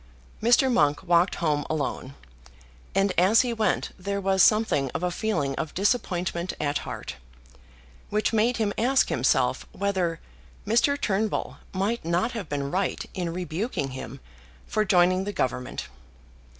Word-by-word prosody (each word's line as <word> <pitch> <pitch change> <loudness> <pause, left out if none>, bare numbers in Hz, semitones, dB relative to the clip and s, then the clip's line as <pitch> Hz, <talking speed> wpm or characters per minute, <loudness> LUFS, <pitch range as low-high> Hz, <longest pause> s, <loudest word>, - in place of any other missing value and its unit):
Mr. 245 +3 +4
Monk 150 -3 +2
walked 175 +1 +3
home 150 -4 0
alone, 140 -3 -3 0.8
and 195 -1 +2
as 195 +5 +5
he 245 -2 -1
went 220 -4 0
there 200 +2 -2
was 190 -1 +2
something 215 - +3
of - - -2
a 180 - 0
feeling 170 -9 -1
of 160 - -4
disappointment 185 -4 0
at 145 -1 0
heart, - - -7 0.9
which 215 +2 0
made 230 +3 +2
him 210 -3 0
ask 260 +4 +3
himself - - +1
whether 185 -5 -1 0.5
Mr. 240 +7 +2
Turnbull 210 -1 -1
might 200 +5 -1
not 175 +8 0
have 225 -5 -6
been 140 -1 -2
right 185 +1 -1
in 175 -2 -3
rebuking 175 - -3
him 130 0 -7 0.5
for 215 - 0
joining 185 -1 +3
the 205 +1 -4
Government. 125 -4 -2
185 Hz, 140 wpm, -26 LUFS, 165-215 Hz, 0.9 s, as